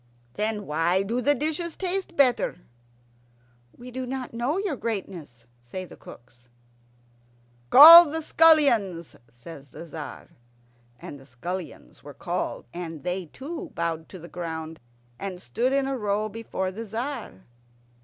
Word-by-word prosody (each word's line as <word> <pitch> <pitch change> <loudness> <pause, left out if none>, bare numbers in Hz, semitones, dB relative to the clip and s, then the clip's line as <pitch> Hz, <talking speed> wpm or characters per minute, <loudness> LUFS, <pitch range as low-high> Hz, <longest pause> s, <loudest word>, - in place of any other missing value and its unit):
"Then 210 +2 -3
why 165 +5 +1
do 230 +5 -2
the 290 +4 +3
dishes 315 +4 -2
taste 375 -1 -3
better?" 250 -9 +2 1.2
"We 250 +1 -11
do 255 +1 -5
not 260 -1 -5
know, 245 +8 -1
your 390 -6 -2
greatness," 175 - -6 0.2
say 150 +11 -7
the - - -13
cooks. 120 0 -16 1.2
"Call 330 +4 +11
the 320 +2 -4
scullions," 235 - +3
says 135 +4 -13
the 170 - -10
Tzar. 155 -2 -9 0.7
And 145 - -9
the 135 - -17
scullions 170 - -8
were - - -11
called, - - -4
and 165 -3 -7
they 180 0 -3
too 320 - -8
bowed 165 -1 -3
to 190 - -10
the 170 -1 -11
ground, 160 -2 -6 0.4
and 190 -2 -6
stood 240 +7 -1
in 275 0 +1
a 270 - -2
row 210 -2 -1
before 205 -4 -4
the 225 +4 -7
Tzar. 225 - -6
205 Hz, 140 wpm, -25 LUFS, 165-265 Hz, 1.2 s, Call